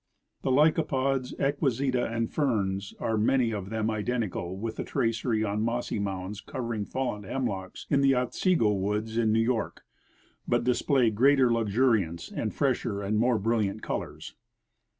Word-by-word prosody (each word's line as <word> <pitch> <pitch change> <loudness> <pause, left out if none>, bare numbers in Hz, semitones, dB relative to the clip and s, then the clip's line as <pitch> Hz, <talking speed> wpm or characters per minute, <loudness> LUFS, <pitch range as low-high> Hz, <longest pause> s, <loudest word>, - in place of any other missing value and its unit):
The - - -1
licapods, 135 -2 +2
equiseta 135 -3 0
and 115 0 0
ferns 100 -9 -1
are 110 -1 0
many 115 +1 +2
of 100 -2 -4
them 110 0 -1
identical 105 -5 -2
with 110 +2 -4
the - - -2
tracery 115 -1 0
on 105 0 -1
mossy 115 -1 -1
mounds 100 +1 -4
covering 115 -6 -4
fallen 125 -4 -3
hemlocks 100 -4 -4
in 140 -1 +2
the 135 -1 +4
Otsego 125 - +2
woods 105 +3 -2
in 115 -2 +2
NeAV 115 +1 +3
York, 115 -1 -2 0.6
but - - +2
display 125 -1 +2
greater 130 +3 +4
luxuriance 110 -6 +1
and - - -2
fresher 100 0 -1
and 105 +2 0
more 120 0 +3
bril 115 +3 +1
liant 100 +2 -3
colors. - - -5
115 Hz, 150 wpm, -28 LUFS, 105-130 Hz, 0.6 s, the